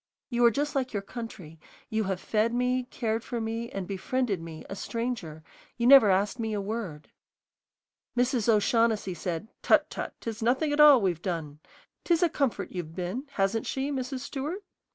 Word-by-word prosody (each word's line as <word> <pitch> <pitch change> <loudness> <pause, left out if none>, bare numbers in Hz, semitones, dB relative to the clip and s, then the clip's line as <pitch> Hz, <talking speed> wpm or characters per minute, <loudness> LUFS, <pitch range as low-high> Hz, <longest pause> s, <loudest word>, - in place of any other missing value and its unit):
You 240 0 +2
are - - +9
just 290 +6 -1
like 260 -3 -1
your 200 -2 -2
country; 200 -8 -8 0.3
you 220 -1 0
have 190 -1 -2
fed 225 +3 0
me, 250 +1 +1
cared 225 -2 -2
for 240 - -4
me, 225 +1 -3
and 195 -2 -5
befriended 200 0 -1
me, 165 -1 -9
a 195 - -6
stranger, 200 -9 -4 0.4
and 235 - +2
never 270 -7 +9
asked 195 +5 +1
me 220 -1 -2
a 205 - -1
word." 195 -7 -5 1.1
Mrs. 245 -2 +2
O'Shaughnessy 220 -2 +2
said, 175 +3 -4
"Tut, - - +3
tut, - - -5
'tis 225 0 -5
nothing 265 +6 +2
at 295 - -1
all 295 -3 +9
we've 175 -4 0
done. 160 -6 -4 0.4
'Tis 340 0 +2
a 345 - +4
comfort 240 - -1
you've 165 -3 -6
been, 185 +9 -3
hasn't 195 +3 0
she, 270 +2 -2
Mrs. 260 -1 -3
Stewart?" 295 +8 -4
225 Hz, 175 wpm, -28 LUFS, 195-255 Hz, 1.1 s, are